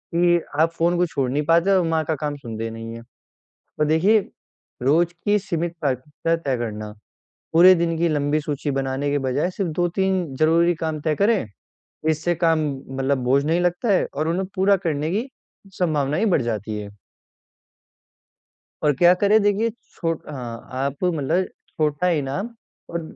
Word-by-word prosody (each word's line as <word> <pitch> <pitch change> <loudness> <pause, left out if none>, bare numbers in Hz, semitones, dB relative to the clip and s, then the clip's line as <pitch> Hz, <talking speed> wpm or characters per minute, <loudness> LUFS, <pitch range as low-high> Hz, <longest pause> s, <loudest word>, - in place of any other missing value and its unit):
कि 175 0 +4 0.2
आप 165 - +3
फ़ोन 170 +1 +1
को 180 - +3
छोड़ 135 -6 -2
नहीं 145 +3 0
पाते 170 +4 +3
और 190 -2 +4
माँ 160 -1 +1
का 160 - 0
काम 150 -1 -3
सुनते 115 -3 -5
नहीं 115 0 -7
हैं। 115 0 -9 0.8
और 150 - +3
देखिए, 180 +8 +4 0.6
रोज़ 165 +7 +2
की 210 0 +4
सीमित 175 -3 -3
प्राथमिकता 145 +4 -1
तय 140 -6 -2
करना। 105 -2 -5 0.6
पूरे 180 +3 +8
दिन 165 -1 0
की 170 - +2
लंबी 150 0 +1
सूची 145 -1 -3
बनाने 135 +1 -1
के 145 - +1
बजाय 140 +7 0
सिर्फ 185 -2 -3
2-3 180 -3 0
ज़रूरी 170 +3 +3
काम 160 -1 -3
तय 155 0 0
करें। 205 - +2 0.6
इससे 160 +3 0
काम, 165 -1 +2 0.3
मतलब, 135 +1 0
बोझ 135 +3 +3
नहीं 165 +3 +1
लगता 180 +5 0
है 190 - +2
और 155 +3 -1
उन्हें 185 +3 -1
पूरा 195 +1 +4
करने 155 0 -1
की 230 +7 -1 0.5
संभावना 150 -5 +1
ही 225 - +1
बढ़ 175 -9 +2
जाती 110 -2 -3
है। 100 -1 -8 1.9
और 150 - +4
क्या 175 +4 +6
करें, 205 +3 +3
देखिए, 205 +3 +2 0.2
छोट 165 -1 -3
अ, - - -8
आप 130 +3 -5
मतलब 175 +1 +1 0.3
छोटा 155 +3 +1
इनाम 140 - -3 0.4
और 170 - -2
160 Hz, 165 wpm, -22 LUFS, 140-175 Hz, 1.9 s, पूरे